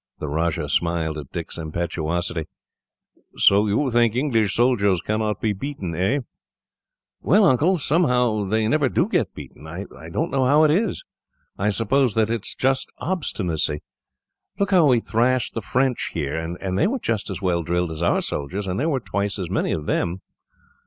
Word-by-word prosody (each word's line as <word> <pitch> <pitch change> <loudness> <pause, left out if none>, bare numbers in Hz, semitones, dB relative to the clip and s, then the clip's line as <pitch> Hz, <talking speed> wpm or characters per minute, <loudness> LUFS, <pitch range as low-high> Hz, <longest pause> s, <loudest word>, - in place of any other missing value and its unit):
The 75 - -5
Rajah 80 +3 -1
smiled 85 -2 0
at 70 - -10
Dick's 85 0 -5
impetuosity. 85 0 -2 0.9
"So 100 +2 +5
you 125 +6 +1
think 120 -1 +3
English 115 -7 +1
soldiers 105 -7 +3
cannot 110 +3 -1
be 110 -2 0
beaten, 100 -5 -5
eh?" 95 - +1 1.0
"Well, 200 +6 +4
Uncle, 170 +5 +3
somehow 125 - +2
they 110 +2 +1
never 145 +2 +2
do 170 - +1
get 175 - -1
beaten. 75 +2 -11
I 90 +5 -6 0.2
don't 80 - -2
know 135 -1 +1
how 150 +3 +5
it 155 - +5
is. 195 +4 0 0.5
I 100 +2 0
suppose 115 +4 +1
that 110 0 +2
it 115 -2 -1
is - - -4
just 130 0 0
obstinacy. 90 - -1 0.7
Look 200 0 0
how 175 -5 +5
we 125 -3 +4
thrashed 125 +3 +1
the 115 - -3
French 125 +5 0
here, 75 -2 -2
and 90 +3 -3
they - - +4
were 260 +6 -1
just 115 - -2
as 95 0 -5
well 90 -2 +1
drilled 85 +1 -1
as 80 +1 -6
our 85 - +2
soldiers, 90 +8 -3
and 95 +2 -2
there 155 +5 +1
were 140 -4 0
twice 100 -2 -2
as 90 -3 -4
many - - 0
of 75 - -2
them." 85 +4 -1
105 Hz, 175 wpm, -23 LUFS, 85-130 Hz, 1.0 s, So